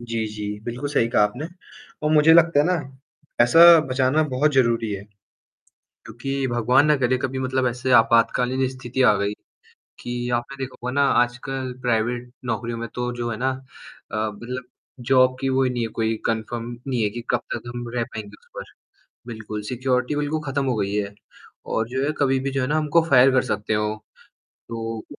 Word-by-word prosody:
जी, 115 Hz, -2 st, -3 dB
जी, 105 Hz, -1 st, -6 dB
बिल्कुल 125 Hz, +4 st, -4 dB
सही 125 Hz, -5 st, +2 dB
कहा 115 Hz, -, +3 dB
आपने 120 Hz, +9 st, -1 dB, 0.6 s
और 150 Hz, -, +1 dB
मुझे 155 Hz, +1 st, +6 dB
लगता 170 Hz, -2 st, +5 dB
है -, -, +2 dB
ना, 180 Hz, -, +2 dB, 0.6 s
पैसा 165 Hz, +7 st, +8 dB
बचाना 130 Hz, +4 st, +2 dB
बहुत 145 Hz, +3 st, +1 dB
ज़रूरी 115 Hz, -4 st, +2 dB
है, 100 Hz, -1 st, -5 dB, 1.0 s
क्योंकि 135 Hz, +4 st, -3 dB
भगवान 125 Hz, +5 st, +3 dB
न 150 Hz, -, +5 dB
करे 130 Hz, 0 st, +1 dB
कभी 130 Hz, +1 st, -3 dB
मतलब 130 Hz, 0 st, 0 dB
ऐसे 125 Hz, +2 st, -3 dB
आपातकालीन 125 Hz, +3 st, +2 dB
स्थिति 130 Hz, 0 st, -3 dB
आ 105 Hz, -4 st, +6 dB
गई, 100 Hz, +1 st, -1 dB, 0.7 s
कि 120 Hz, 0 st, -4 dB
आपने 120 Hz, +3 st, -5 dB
देखा 130 Hz, -, -7 dB
होगा 125 Hz, -, -2 dB
ना 140 Hz, -, +4 dB, 0.2 s
आजकल 125 Hz, +1 st, -5 dB
प्राइवेट 120 Hz, +1 st, -1 dB
नौकरियों 115 Hz, 0 st, -3 dB
में 115 Hz, 0 st, -5 dB
तो 125 Hz, 0 st, -2 dB
जो 120 Hz, 0 st, -2 dB
है 110 Hz, -, -4 dB
ना 130 Hz, +2 st, 0 dB, 0.6 s
अ, -, -, -4 dB
मतलब 115 Hz, +4 st, -4 dB, 0.5 s
जॉब 130 Hz, -1 st, +5 dB
की 135 Hz, -, 0 dB
वो 135 Hz, 0 st, +2 dB
नहीं 125 Hz, -1 st, -1 dB
है -, -, -1 dB
कोई 110 Hz, 0 st, +1 dB
कन्फर्म 115 Hz, +1 st, -3 dB, 0.2 s
नहीं 125 Hz, -4 st, 0 dB
है 105 Hz, -, +1 dB
कि 120 Hz, +3 st, -7 dB
कब -, -, +2 dB
तक -, -, -4 dB
हम 120 Hz, 0 st, -5 dB
रह 120 Hz, -, +1 dB
पाएँगे 105 Hz, -2 st, -9 dB
उस -, -, -28 dB
पर -, -, -5 dB, 0.6 s
बिल्कुल 110 Hz, -2 st, -6 dB
सिक्योरिटी 125 Hz, +2 st, 0 dB
बिल्कुल 150 Hz, +1 st, -1 dB
खत्म 140 Hz, 0 st, -1 dB
हो 130 Hz, -2 st, 0 dB
गई 100 Hz, -1 st, -1 dB
है 100 Hz, -1 st, -2 dB, 0.6 s
और 110 Hz, -, 0 dB
जो 130 Hz, +2 st, -2 dB
है 150 Hz, -, 0 dB
कभी 135 Hz, -2 st, +2 dB
भी 135 Hz, +1 st, -3 dB
जो 135 Hz, 0 st, -1 dB
है 130 Hz, -, -1 dB
ना 150 Hz, +3 st, +1 dB
हमको 155 Hz, +2 st, +3 dB
फायर 130 Hz, 0 st, +6 dB
कर 130 Hz, -1 st, +3 dB
सकते 105 Hz, +1 st, -2 dB
हो। 105 Hz, 0 st, 0 dB, 0.7 s
तो 115 Hz, -1 st, -5 dB
125 Hz, 190 wpm, -23 LUFS, 115-135 Hz, 1.0 s, पैसा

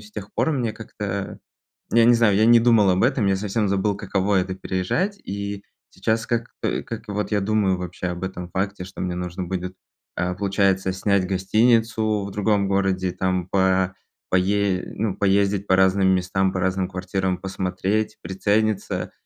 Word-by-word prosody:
с 105 Hz, 0 st, -14 dB
тех 105 Hz, -1 st, -8 dB
пор -, -, +1 dB
мне 120 Hz, -6 st, -1 dB
как-то, 105 Hz, -3 st, -5 dB, 0.5 s
я 115 Hz, -1 st, +5 dB
не 120 Hz, -, +7 dB
знаю, 110 Hz, -4 st, +3 dB
я 110 Hz, -, +4 dB
не 120 Hz, 0 st, +7 dB
думал 115 Hz, -4 st, +4 dB
об 90 Hz, -, +1 dB
этом. 125 Hz, -4 st, +2 dB
Я 95 Hz, -, +3 dB
совсем 105 Hz, +1 st, -1 dB
забыл, 100 Hz, +1 st, +1 dB
каково 100 Hz, 0 st, 0 dB
это- 95 Hz, 0 st, -4 dB
переезжать. 95 Hz, -, -1 dB
И 100 Hz, 0 st, -5 dB, 0.3 s
сейчас 110 Hz, +4 st, -1 dB
как, 120 Hz, 0 st, -1 dB
э, -, -, -1 dB
как 115 Hz, 0 st, -7 dB
вот 105 Hz, +1 st, -3 dB
я 105 Hz, -1 st, +1 dB
думаю 100 Hz, -2 st, +1 dB
вообще 90 Hz, +1 st, -5 dB
об 90 Hz, +1 st, -4 dB
этом 90 Hz, -1 st, -5 dB
факте, 95 Hz, 0 st, -2 dB
что 95 Hz, -, -8 dB
мне 90 Hz, -1 st, -2 dB
нужно 90 Hz, +1 st, -4 dB
будет, 90 Hz, 0 st, -4 dB, 0.4 s
а, 90 Hz, 0 st, -1 dB
получается, 95 Hz, -1 st, +1 dB
снять 95 Hz, -1 st, +1 dB
гостиницу 110 Hz, +2 st, +2 dB
в 100 Hz, -, -5 dB
другом 105 Hz, -1 st, +1 dB
городе, 95 Hz, -2 st, 0 dB
там 95 Hz, -1 st, -1 dB
по 95 Hz, -1 st, +2 dB, 0.3 s
па 95 Hz, -, +3 dB
пае 100 Hz, 0 st, +1 dB
ну, 105 Hz, -2 st, -1 dB
поездить 100 Hz, 0 st, +2 dB
по 95 Hz, -, +4 dB
разным 95 Hz, 0 st, +4 dB
местам, 95 Hz, +1 st, +1 dB
по 95 Hz, -, -2 dB
разным 95 Hz, 0 st, 0 dB
квартирам, 95 Hz, 0 st, -2 dB
посмотреть, 95 Hz, +3 st, -2 dB
прицениться. 100 Hz, +3 st, -1 dB
95 Hz, 175 wpm, -23 LUFS, 95-105 Hz, 0.5 s, не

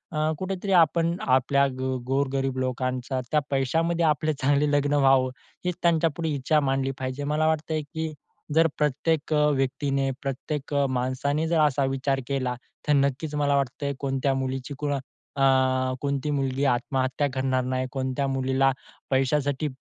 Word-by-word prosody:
अ, 155 Hz, +1 st, +1 dB
कुठेतरी 190 Hz, +1 st, -3 dB
आपण 170 Hz, +1 st, +3 dB
आपल्या 135 Hz, +2 st, +3 dB
गो 130 Hz, 0 st, -1 dB
गोरगरीब 135 Hz, -1 st, 0 dB
लोकांचा 130 Hz, 0 st, -2 dB
त्या 150 Hz, -, +4 dB
पैशामध्ये 165 Hz, +5 st, +1 dB
आपले 155 Hz, 0 st, +1 dB
चांगले 145 Hz, +2 st, +3 dB
लग्न 145 Hz, 0 st, +2 dB
व्हावं 135 Hz, -2 st, +4 dB, 0.4 s
हीच 180 Hz, -1 st, 0 dB
त्यांच्यापुढे 165 Hz, -1 st, +2 dB
इच्छा 150 Hz, +1 st, +1 dB
मांडली 135 Hz, -1 st, 0 dB
पाहिजे 130 Hz, +2 st, -3 dB
मला 155 Hz, +1 st, +2 dB
वाटतंय 155 Hz, 0 st, 0 dB
की 160 Hz, +2 st, -5 dB, 0.4 s
जर 165 Hz, 0 st, +6 dB
प्रत्येक 150 Hz, +2 st, 0 dB
अ, 150 Hz, 0 st, +4 dB
व्यक्तीने 135 Hz, 0 st, 0 dB
प्रत्येक 140 Hz, +1 st, -4 dB, 0.2 s
माणसाने 130 Hz, +5 st, -1 dB
जर 165 Hz, -1 st, +2 dB
असा 140 Hz, -2 st, +2 dB
विचार 135 Hz, 0 st, 0 dB
केला 130 Hz, -3 st, -1 dB, 0.3 s
तर 150 Hz, -, +4 dB
नक्कीच 140 Hz, +2 st, +1 dB
मला 145 Hz, -1 st, +2 dB
वाटतंय 140 Hz, +1 st, -1 dB
कोणत्या 135 Hz, 0 st, 0 dB
मुलीची 130 Hz, +1 st, -3 dB
कोण 145 Hz, -1 st, -1 dB, 0.4 s
अ, 130 Hz, -1 st, +3 dB
कोणती 140 Hz, 0 st, -1 dB
मुलगी 135 Hz, 0 st, 0 dB
आत्महत्या 130 Hz, +2 st, 0 dB
करणार 130 Hz, -1 st, 0 dB
नाही. 130 Hz, 0 st, -1 dB
कोणत्या 130 Hz, +1 st, -1 dB
मुलीला 135 Hz, 0 st, +2 dB, 0.4 s
पैशासाठी 140 Hz, +2 st, +1 dB
140 Hz, 140 wpm, -26 LUFS, 130-150 Hz, 0.4 s, जर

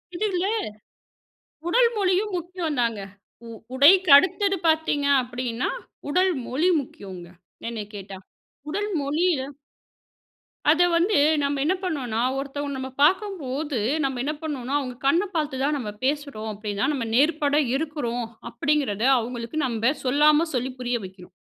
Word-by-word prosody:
இது 425 Hz, -, -1 dB
இல்ல. 360 Hz, +1 st, 0 dB, 1.2 s
உடல் 480 Hz, +5 st, +4 dB
மொழியும் 390 Hz, +1 st, +1 dB
முக்கியந்தாங்க. 310 Hz, -, -2 dB, 0.5 s
உ -, -, -9 dB, 0.3 s
உடைக்கு 335 Hz, +6 st, +6 dB
அடுத்தது 390 Hz, +5 st, +3 dB
பாத்தீங்க 315 Hz, -3 st, +1 dB, 0.2 s
அப்படின்னா, 245 Hz, -1 st, -3 dB, 0.4 s
உடல் 370 Hz, +3 st, +3 dB
மொழி 310 Hz, +8 st, +1 dB
முக்கியங்க 190 Hz, -9 st, -10 dB, 0.4 s
என்னை 225 Hz, -3 st, -4 dB
கேட்டா. 195 Hz, -1 st, -8 dB, 0.5 s
உடல் 410 Hz, +6 st, -2 dB
மொழிய 310 Hz, +3 st, +1 dB, 1.3 s
அத 325 Hz, +3 st, +3 dB, 0.2 s
வந்து 365 Hz, +4 st, +2 dB, 0.3 s
நம்ம 280 Hz, 0 st, -1 dB
என்ன 320 Hz, +6 st, +2 dB
பண்ணுவோன்னா, 270 Hz, -, -2 dB, 0.2 s
ஒருத்தவங்கள 280 Hz, 0 st, -4 dB
நம்ம 260 Hz, 0 st, -5 dB
பாக்கும்போது 300 Hz, -, +1 dB, 0.2 s
நம்ம 265 Hz, -2 st, -1 dB
என்ன 300 Hz, -, -1 dB
பண்ணுவோன்னா, 280 Hz, -3 st, -3 dB
அவுங்க 255 Hz, -3 st, -5 dB
கண்ண 335 Hz, +7 st, +4 dB
பாத்து 300 Hz, -5 st, -1 dB
தான் 295 Hz, +2 st, +1 dB
நம்ம 235 Hz, -6 st, -4 dB
பேசுறோம் 280 Hz, -5 st, -2 dB
அப்டின்னா, 210 Hz, +2 st, -3 dB
நம்ம 265 Hz, -6 st, -2 dB
நேர்பட 290 Hz, +1 st, +3 dB, 0.2 s
இருக்குறோம் 270 Hz, -6 st, -2 dB, 0.2 s
அப்படிங்கிறத 280 Hz, -8 st, 0 dB, 0.2 s
அவுங்களுக்கு 235 Hz, +4 st, -5 dB
நம்ப 235 Hz, 0 st, +1 dB
சொல்லாம 295 Hz, +4 st, +4 dB
சொல்லி 255 Hz, 0 st, -1 dB
புரிய 245 Hz, -1 st, -1 dB
வைக்கிறோம். 185 Hz, -1 st, -13 dB
285 Hz, 125 wpm, -24 LUFS, 245-325 Hz, 1.3 s, உடைக்கு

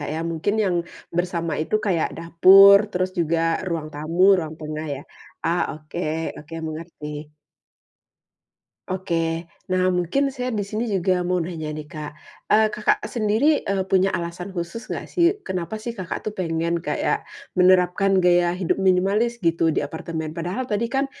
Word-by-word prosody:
Kak 145 Hz, -, -4 dB
ya, 160 Hz, -, -2 dB
mungkin 165 Hz, +6 st, -1 dB
yang 180 Hz, -2 st, +1 dB, 0.4 s
bersama 175 Hz, -2 st, -1 dB
itu 160 Hz, -, -4 dB
kayak 175 Hz, -5 st, +1 dB
dapur 190 Hz, +4 st, +8 dB
terus 185 Hz, 0 st, -1 dB
juga 165 Hz, 0 st, +1 dB, 0.3 s
ruang 165 Hz, -3 st, -3 dB
tamu, 170 Hz, +6 st, +4 dB
ruang 160 Hz, -2 st, -4 dB
tengah 155 Hz, 0 st, -5 dB
ya, 135 Hz, -, -7 dB, 0.5 s
ah, 170 Hz, +1 st, +2 dB, 0.2 s
oke 155 Hz, +3 st, -6 dB, 0.4 s
oke 160 Hz, +2 st, -10 dB
mengerti. 150 Hz, -2 st, -7 dB, 1.6 s
Oke, 165 Hz, -3 st, -1 dB, 0.2 s
nah 185 Hz, 0 st, +2 dB
mungkin 270 Hz, +11 st, 0 dB
saya 250 Hz, -1 st, -3 dB
di 210 Hz, -4 st, -2 dB
sini 215 Hz, +2 st, -3 dB
juga 185 Hz, -1 st, +1 dB
mau 180 Hz, +1 st, 0 dB
nanya 165 Hz, -3 st, -4 dB
nih 150 Hz, 0 st, -6 dB
Kak, 150 Hz, 0 st, -7 dB, 0.4 s
eee, 220 Hz, +1 st, +5 dB
Kakak 210 Hz, 0 st, +2 dB
sendiri, 230 Hz, +7 st, +2 dB
eee, 195 Hz, -1 st, -1 dB
punya 190 Hz, 0 st, +3 dB
alasan 175 Hz, +2 st, -4 dB
khusus 190 Hz, +5 st, -6 dB
gak -, -, -4 dB
sih 355 Hz, +3 st, +2 dB
kenapa 185 Hz, +3 st, -3 dB
sih 230 Hz, +2 st, -5 dB
Kakak 185 Hz, 0 st, -6 dB
tuh 210 Hz, -, -3 dB
pengen 170 Hz, -1 st, -1 dB
kayak -, -, -1 dB, 0.3 s
menerapkan 185 Hz, +1 st, +4 dB
gaya 175 Hz, -1 st, +4 dB
hidup 190 Hz, +1 st, 0 dB
minimalis 195 Hz, +6 st, +2 dB
gitu 165 Hz, -4 st, +2 dB
di 150 Hz, -, -1 dB
apartemen 160 Hz, 0 st, -5 dB
padahal 180 Hz, +10 st, -3 dB
tadi 230 Hz, +1 st, -1 dB
kan 270 Hz, +1 st, +1 dB
180 Hz, 155 wpm, -23 LUFS, 165-200 Hz, 1.6 s, dapur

